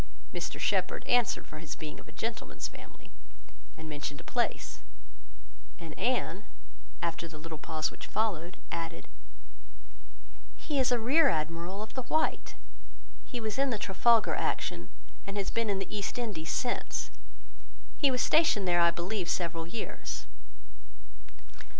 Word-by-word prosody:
Mr - - -3
Shepherd - - +1
answered 245 -3 +3
for 155 - -8
his 160 0 -5
being 155 -2 -6
of - - -13
a - - -10
gentleman's 230 0 -3
family, - - -13 0.7
and 160 - -7
mentioned 145 -1 -4
a - - -10
place; - - 0 1.0
and - - -7
Anne, - - 0 0.6
after 170 0 -1
the 160 -1 -10
little 160 0 -7
pause 155 0 0
which - - -8
followed, 185 -5 0
added— 165 -1 -4 1.5
"He 295 -4 -1
is 260 -1 +4
a 245 - +5
rear 265 +8 +5
admiral 165 +5 -1
of 220 - -9
the 260 - -1
white. 315 +5 +1 0.7
He 245 - -4
was 220 +2 -2
in 275 0 +4
the 230 - +1
Trafalgar 220 +3 +4
action, - - -1 0.4
and 200 +1 -3
has 200 - 0
been 230 -1 +1
in 200 - +2
the 195 +2 -3
East 205 +2 -2
Indies 205 -10 -2
since; 245 - 0 0.9
he 285 - +6
was 250 -1 +2
stationed 305 - +5
there, 175 -1 +5
I 170 - +7
believe, 175 +2 -1
several 170 -2 0
years." 215 +5 -4
195 Hz, 145 wpm, -31 LUFS, 165-235 Hz, 1.5 s, I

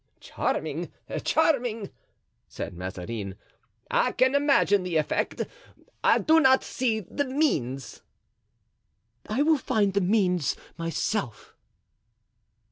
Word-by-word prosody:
"Charming! - - -3 0.3
charming!" 245 -10 +1 0.6
said - - -6
Mazarin. 95 +3 -5 0.6
"I - - +2
can 260 +1 +3
imagine 280 -8 +3
the 180 -2 -4
effect, 155 - -1 0.6
I - - +5
do 320 +1 +4
not 265 -3 +5
see 230 -4 -1
the 285 - -3
means." 150 - -1 1.3
"I 240 +7 +2
will 310 -1 +3
find 205 -6 +1
the 200 - +2
means 180 - +2 0.2
myself." 165 - -3
210 Hz, 100 wpm, -26 LUFS, 155-265 Hz, 1.3 s, I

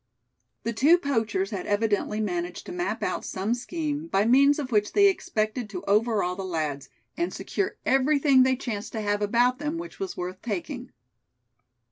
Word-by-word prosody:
The 230 - -2
two 290 +10 +5
poachers 225 - -1
had 195 -4 -4
evidently 210 0 0
managed 180 -4 -3
to - - -7
map 355 0 -2
out - - -2
some 195 +4 -2
scheme 300 +4 -3
by 200 -9 +2
means 275 +4 +5
of 275 -4 -4
which 210 -2 +1
they 405 -1 +6
expected 220 - -1
to 185 -3 -6
overawe 210 -3 +2
the 195 - -5
lads, 155 -6 -3 0.3
and 345 +1 -1
secure 395 -1 -3
everything 270 0 +4
they 260 0 +4
chanced 230 -5 -5
to 220 - -2
have 205 0 0
about 245 +4 +2
them, 295 +2 -2
which 340 +1 -8
was 385 -2 -4
worth 180 +1 -5
taking. 245 - -5
230 Hz, 170 wpm, -26 LUFS, 205-285 Hz, 0.3 s, they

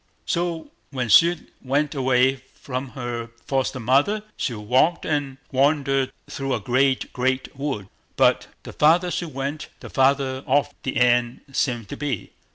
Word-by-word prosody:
So, 170 -2 -2 0.2
when 125 -4 -3
she 170 +10 +7 0.3
went 140 +3 0
away 130 -1 +2 0.2
from 130 0 -5
her 120 -2 -4 0.2
foster 135 -1 -1
mother, 140 - +2
she 120 - -2
walked 130 +11 +2
and 145 -3 -1
wandered 135 -1 +2 0.2
through 135 -1 -2
a - - -2
great, 130 +5 +1
great 130 +2 -1
wood; 135 -8 -3 0.3
but - - +3 0.2
the - - -9
farther 170 +4 +4
she 175 - -2
went, 145 0 -5
the - - -10
farther 135 0 +2
off 140 +2 +2
the 135 - -3
end 120 -1 +2
seemed 120 -5 -1
to - - -6
be. 140 -8 -3
135 Hz, 150 wpm, -23 LUFS, 125-145 Hz, 0.3 s, she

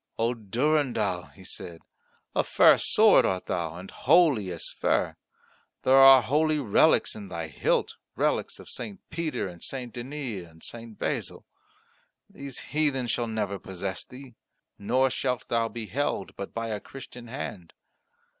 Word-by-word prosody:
"O 115 +2 +1
Durendal," 115 - 0
he 95 - -17
said, 85 -2 -7 0.5
"a - - +3
fair - - +6
sword - - +5
art 95 -1 -1
thou, 85 -2 -2
and 90 +2 -9
holy 145 - +4
as 85 - -4
fair. - - 0 0.7
There 130 - +5
are 135 -1 +9
holy 155 +6 +2
relics 125 -9 +3
in 105 -2 -8
thy 85 -3 -5
hilt, 70 - 0 0.2
relics - - 0
of - - -13
St. 110 -5 -6
Peter 160 -9 -2
and 85 -2 -11
St. 125 -3 -5
Denis 120 -7 -5
and 80 0 -17
St. 115 -2 -7
Basil. - - -3 0.8
These 140 -2 -7
heathen 145 -4 +1
shall 120 0 -1
never 105 -3 -2
possess 95 0 -5
thee; 130 -1 -12 0.5
nor 130 +6 +2
shalt 125 0 -2
thou 115 -1 +1
be 115 -1 -6
held 135 -5 -2
but 100 - -6
by 115 0 -4
a 105 -1 -2
Christian 125 0 -10
hand." 105 - -7
115 Hz, 150 wpm, -27 LUFS, 95-135 Hz, 0.8 s, are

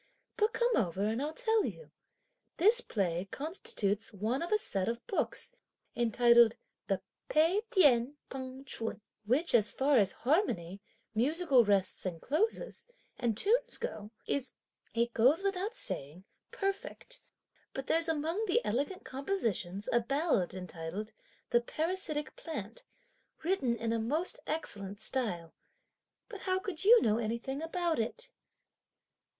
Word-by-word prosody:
But 430 +1 +1
come 475 0 +2
over 190 -3 0
and 225 +4 0
I'll 295 +2 -1
tell 445 +2 +1
you. 485 - -6 0.7
This 435 +8 +5
play 180 - -1
constitutes 225 - -3
one 220 +6 -2
of 340 - -4
a 425 - +5
set 195 - -1
of 235 +1 -4
books, 410 - -1 0.4
entitled 235 0 +5 0.3
the - - -1 0.3
'Pei 330 +7 +4
Tien 285 - +4
Peng 260 0 -7
Ch'un,' 225 -4 -3 0.3
which, 275 +10 +2
as 225 -3 +5
far 275 +1 +3
as 200 - +3
harmony, 200 - +1 0.3
musical 275 +3 +3
rests 200 -3 +2
and 175 -3 -3
closes, 435 - -1 0.3
and 230 -3 0
tune 440 - +4 0.2
go, 215 - -5 0.2
is, 270 -2 -2 0.4
it 235 0 +1
goes 275 +11 +4
without 395 +3 -1
saying, 150 - -6 0.3
perfect; 395 +5 -4 0.5
but 270 - -5
there's 330 +3 +2
among 325 +6 0
the 360 - +3
elegant 280 - -1
compositions 225 - -2
a 240 - +5
ballad 235 - 0
entitled: 180 +3 -5 0.4
'the 240 - +4
Parasitic 305 0 -2
Plant,' 230 -9 -6 0.6
written 310 -9 +1
in 230 0 -1
a 230 - 0
most 300 +11 +2
excellent 200 -10 -1
style; 215 -8 -2 0.7
but 425 -5 -8
how 370 -1 +1
could 375 -3 -4
you 465 +4 +7
know 220 0 +2
anything 235 +5 -3
about 335 -1 -1
it?" - - -3
265 Hz, 135 wpm, -32 LUFS, 215-350 Hz, 0.7 s, you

